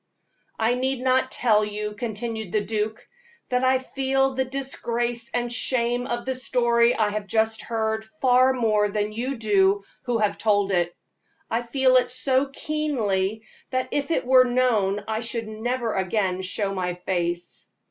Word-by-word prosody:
"I 225 +2 +2
need 260 +1 -1
not 260 0 +2
tell 220 -5 +2
you," 210 0 -4
continued 220 -2 -4
the 215 - +1
duke, 215 0 -3 0.4
"that 250 0 +1
I 260 0 +4
feel 270 +1 0
the 260 0 0
disgrace 240 -3 -3
and 240 0 -1
shame 245 0 0
of 240 -2 -3
the 260 - -1
story 240 -2 +2
I 215 -2 +2
have 210 -1 -4
just 220 +2 +1
heard 220 -1 -2
far 255 +1 +3
more 215 -5 +2
than 210 +1 -2
you 250 +5 -2
do 200 -2 +3 0.2
who 245 -2 +1
have 210 -2 0
told 205 -2 +2
it. 175 -2 0 0.6
I 230 - +1
feel 255 +2 +3
it 250 -1 +2
so 260 +2 +1
keenly, 225 -9 -1 0.3
that 255 0 -1
if 285 +1 -1
it 325 - 0
were 255 0 +7
known, 225 -6 +1
I 220 0 -1
should 230 -1 -3
never 230 +2 -2
again 190 -1 0
show 195 +1 -2
my 180 -2 -2
face. 175 -1 -3
230 Hz, 160 wpm, -24 LUFS, 210-255 Hz, 0.6 s, were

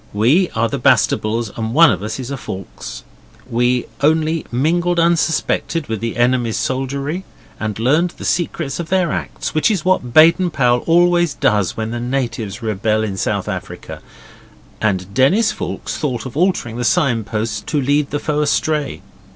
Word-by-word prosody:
We 135 - +3
are 115 +1 +2
the - - -3
Bastables 110 0 +1
and 115 +1 -3
one 165 0 +7
of - - -2
us 110 +3 -4
is 130 +1 -5
a - - -2
Foulkes. 95 - -8 0.4
We 125 0 +1 0.2
only 160 +2 +1
mingled 170 +7 +1
unsuspected 165 -1 +1
with 110 -2 -3
the 115 +1 -4
enemy's 120 -2 +1
soldiery 140 +6 -2 0.4
and 110 -1 -3
learned 150 +10 +1
the - - -7
secrets 170 -4 -1
of 170 - -5
their 185 -3 +1
acts, 70 -9 -4
which 155 - +2
is 195 -7 -1
what 185 -10 +1
Baden 165 +6 +6
Powell 125 -5 +2
always 175 -1 +3
does 105 -4 +1
when 110 0 -3
the 120 - -3
natives 120 -4 -3
rebel 110 0 0
in 100 -3 -3
South 95 - -2
Africa; - - -6 0.8
and 95 -3 -1
Denis 180 - +3
Foulkes - - -5
thought 125 -7 -3
of 130 - -7
altering 160 -9 0
the 125 - -2
sign 120 -3 +2
posts 105 0 -3
to 150 - 0
lead 145 +2 +1
the 145 - -1
foe 150 0 -1
astray. 150 -3 0
130 Hz, 165 wpm, -18 LUFS, 110-160 Hz, 0.8 s, one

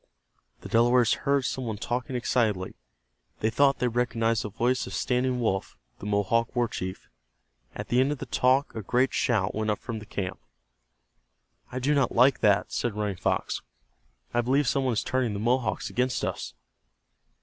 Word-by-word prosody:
The - - -8
Delawares 120 0 +4 0.2
heard 140 -2 +3
some 130 +1 -2
one 110 -2 -3
talking 125 +4 -3
excitedly. 110 -6 0 0.7
They 110 - +1
thought 140 +3 +3
they 125 - +1
recognized 115 -1 +1
the 105 - -4
voice 125 +5 0
of - - -6
Standing 125 0 0
Wolf, 95 -5 -1 0.2
the 105 - -6
Mohawk 105 +4 +1
war 120 -1 +2
chief. 95 -3 -6 0.7
At - - -6
the 120 - +3
end 135 +2 +3
of 150 - -2
the 135 - -6
talk 130 +3 +2
a 110 - -4
great 125 +6 +1
shout 105 -6 +1
went 110 0 -1
up 105 - +1
from 115 -4 -6
the 105 - -12
camp. 95 -3 -4 1.3
"I 130 - -5
do 135 +4 +1
not 140 -4 +1
like 130 +3 +5
that," 100 -2 +3
said 120 -4 -1
Running 105 -2 -2
Fox. - - -1 0.7
"I 120 - +3
believe 135 +4 +2
some 135 +2 +1
one 130 - +1
is 110 - 0
turning 130 -4 0
the 100 - -3
Mohawks 120 0 0
against 125 +1 0
us." - - -4
120 Hz, 180 wpm, -27 LUFS, 110-130 Hz, 1.3 s, like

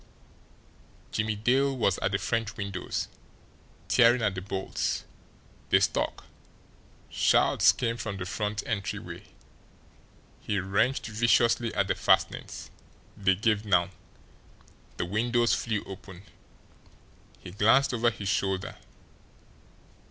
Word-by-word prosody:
Jimmie 110 0 -1
Dale 130 +5 +1
was 100 -6 +1
at - - -1
the 100 - +1
French 115 0 -2
windows, 100 -3 -3 0.8
tearing 120 -1 +4
at 105 -2 +1
the 95 - -5
bolts. 95 0 -3 0.6
They - - +5
stuck. - - -1 0.9
Shouts - - +4
came 115 -1 -2
from 110 -4 -5
the 95 - -5
front 105 +2 -3
entryway. 100 -3 -4 1.1
He 105 - -2
wrenched 100 +8 0
viciously 115 +1 +2
at 100 -2 +1
the - - +2
fastenings. - - 0 0.4
They 95 -1 +2
gave 105 +1 +1
now. 90 -5 +2 1.1
The - - -1
windows 120 +5 +1
flew 110 -3 -1
open. 95 -1 -10 1.1
He 90 - -11
glanced 120 +8 +3
over 120 0 +3
his 100 -3 -6
shoulder. 95 -1 -1
105 Hz, 110 wpm, -28 LUFS, 95-115 Hz, 1.1 s, They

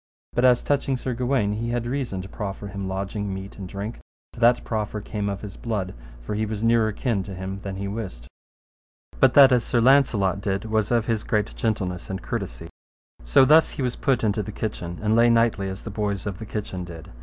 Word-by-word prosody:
But 120 - +2
as 125 -1 +5
touching 140 -2 +1
Sir 125 0 -3
Gawaine, 120 -3 +1
he 115 +2 -3
had 120 0 -1
reason 120 -7 -2
to - - -8
proffer 100 +1 -5
him 100 -1 -5
lodging, 100 +2 -3
meat, 95 +1 -7
and 95 -2 -6
drink, 100 +4 -5 0.3
for - - -11
that 120 +1 +4
proffer 105 -1 -2
came 105 0 -3
of 100 -1 -4
his 105 -2 -8
blood, 105 -6 -3 0.3
for 105 - -4
he 105 +1 0
was 110 0 -3
nearer 115 -1 +3
kin 110 -1 -1
to 95 0 -7
him 95 +1 -5
than 100 -1 -5
he 100 +1 -4
wist. 95 - -6 0.9
But 130 -2 +5
that 140 -2 +9
as 125 -2 +4
Sir 120 - +1
Launcelot 115 -7 +4
did 100 +1 -2
was 110 -1 0
of 120 -2 +2
his 115 -2 0
great 105 -1 -1
gentleness 95 -6 -2
and 95 0 -3
courtesy. - - -5 0.6
So - - +5
thus 155 +3 +6
he 135 - -4
was 125 -1 -1
put 130 -4 +1
into 105 0 +1
the 105 - -6
kitchen, 90 -5 -4
and 110 +1 +3
lay 120 +1 +6
nightly 115 -4 +2
as 95 0 -7
the 110 - -6
boys 100 -1 -2
of 100 -3 -4
the 110 - -7
kitchen 100 -4 -4
did. 85 -2 -10
105 Hz, 220 wpm, -24 LUFS, 95-120 Hz, 0.9 s, that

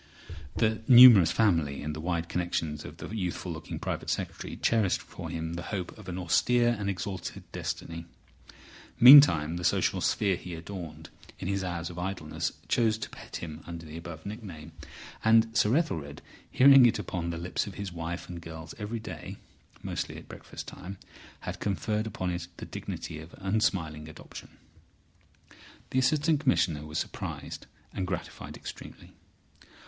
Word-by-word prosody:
The 110 -1 +1
numerous 120 -8 +10
family 80 -11 +1
and 75 0 -3
the 80 - -6
wide 85 0 -1
connections 80 -3 -2
of - - -10
the - - -7
youthful 90 -2 -3
looking 80 -1 -6
Private - - -4
Secretary - - -3
cherished 110 -5 +2
for - - -9
him 80 0 -4
the 85 - -4
hope 95 -4 -4
of 105 -4 -11
an 90 - -4
austere 120 +7 +3
and 100 -1 -1
exalted 95 -1 -4
destiny. 85 0 -5 0.9
Meantime 85 - +9
the 90 - -5
social - - +2
sphere 100 -3 +2
he 90 -2 -7
adorned 80 -2 -8 0.3
in - - -5
his 100 0 -1
hours 85 -1 -3
of 85 - -8
idleness 90 -4 -3 0.2
chose 110 -2 +2
to 110 - -6
pet - - -10
him 80 -1 -6
under 85 -1 -7
the 75 0 -9
above 85 -1 -8
nickname. 95 -7 -8 0.5
And 115 0 +4
Sir 125 +1 +4
Ethelred, 75 - -2 0.3
hearing 135 -1 +8
it 115 - 0
on 85 -2 -1
the 85 - -3
lips 85 +4 -2
of 100 - -8
his 100 -3 -5
wife 85 +1 -5
and 85 -1 -7
girls 80 0 -9
every 105 +3 -4
day 90 -8 -8 0.5
(mostly - - -4
at - - -11
breakfast - - -9
time), 95 +2 -8 0.4
had - - -5
conferred 105 +2 -1
upon 95 -4 -3
it 85 0 -4
the - - -7
dignity 80 - -6
of 80 +2 -11
unsmiling 95 -6 -1
adoption. 80 - -12 1.3
The 130 - +2
Assistant 150 +3 +2
Commissioner 85 - +1
was 75 - -5
surprised - - -5 0.3
and 95 - -2
gratified 90 -2 -5
extremely. - - -10
90 Hz, 160 wpm, -29 LUFS, 80-110 Hz, 1.3 s, numerous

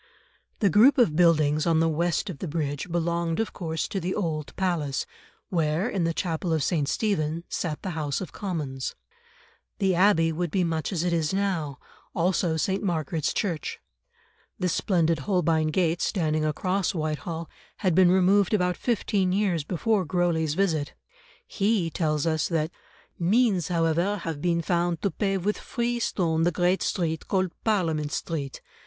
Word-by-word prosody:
The 200 - +4
group 250 - +6
of 225 -12 +4
buildings 155 -2 +3
on 165 -1 +3
the 165 - +3
west 170 +5 0
of 145 - -10
the 185 - -4
bridge 145 +1 -3
belonged 170 0 0
of 225 - -1
course 160 -3 -3
to 195 - -2
the 185 +1 -2
old 155 -6 -2
Palace, 165 -8 -1 0.4
where, 165 +2 +1
in 195 -8 -1
the 165 - +1
chapel 170 0 -2
of 155 -3 +1
St. 150 -4 0
Stephen, 170 -7 -1
sat 155 -4 -3
the 190 - -3
House 150 -4 -2
of 185 - -6
Commons. 150 - -4 0.8
The 190 -2 +2
Abbey 175 -3 +4
would 170 +2 -2
be 185 +3 +1
much 165 0 -1
as 175 -4 -1
it 175 -1 0
is 165 +2 0
now, 170 -9 -1 0.4
also 170 -1 +1
St. 190 +4 0
Margaret's 160 -4 -1
Church. 170 -8 -2 0.8
The 180 - 0
splendid 165 -3 +1
Holbein 165 -1 +1
gate 165 +1 +1
standing 155 -5 0
across 185 +5 0
Whitehall 160 +1 -3 0.3
had 185 -5 +1
been 185 +1 +6
removed 190 +3 +4
about 180 -2 +1
fifteen 200 -5 0
years 185 -5 +1
before 195 +5 0
Grosley's 165 -3 0
visit. 160 -6 0 0.5
He 200 - 0
tells 155 -2 0
us 160 -1 +1
that: 160 -1 -1 0.5
"Means, 195 0 +2
however, 170 +3 +1
have 165 -5 -5
been 170 -1 +1
found 170 -1 0
to 200 - +1
pave 195 +1 -1
with 210 - 0
free 240 0 -2
stone 165 -8 0
the 175 +2 +3
great 175 +3 +1
street 160 -4 -1
called 185 -2 +1
Parliament 165 -9 0
Street. 145 -5 -4
170 Hz, 160 wpm, -26 LUFS, 160-190 Hz, 0.8 s, group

